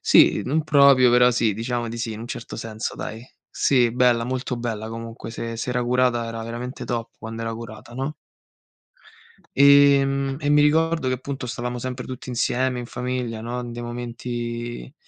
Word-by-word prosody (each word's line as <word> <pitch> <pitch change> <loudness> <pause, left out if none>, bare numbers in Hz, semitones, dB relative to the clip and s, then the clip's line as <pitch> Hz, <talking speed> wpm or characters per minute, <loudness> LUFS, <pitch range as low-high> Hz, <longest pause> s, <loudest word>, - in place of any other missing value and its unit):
Sì, - - +5
non 155 +5 +1
proprio 140 -4 +6
però 125 0 +6
sì, 115 -3 +1
diciamo 120 +2 -2
di 115 - -6
sì, 115 -1 -3
in 110 - -7
un 115 - -6
certo 120 -2 -7
senso, 110 0 -5
dai. 115 +3 -6 0.2
Sì, 125 -4 +2
bella, 125 -2 +3
molto 125 0 -3
bella 110 -2 -4
comunque. 115 0 -7
Se 115 0 -5
se 125 - -3
era 125 0 0
curata 120 -1 +1
era 115 0 -5
veramente 120 +3 -6
top 115 -2 -3
quando 115 0 -6
era 115 0 -3
curata, 115 +1 -10
no? 135 +4 -3 1.4
Ehm, 140 -1 +5
e 145 -2 -1
mi 150 0 +5
ricordo 160 0 +2
che 130 - +1
appunto 130 0 -6
stavamo 125 +1 -4
sempre 125 0 -5
tutti 130 0 -7
insieme 125 +1 0
in 120 - -5
famiglia, 125 -3 -3
no, 120 +2 -4
in 120 -1 -6
dei 120 0 -6
momenti 120 0 -5
120 Hz, 180 wpm, -23 LUFS, 115-130 Hz, 1.4 s, proprio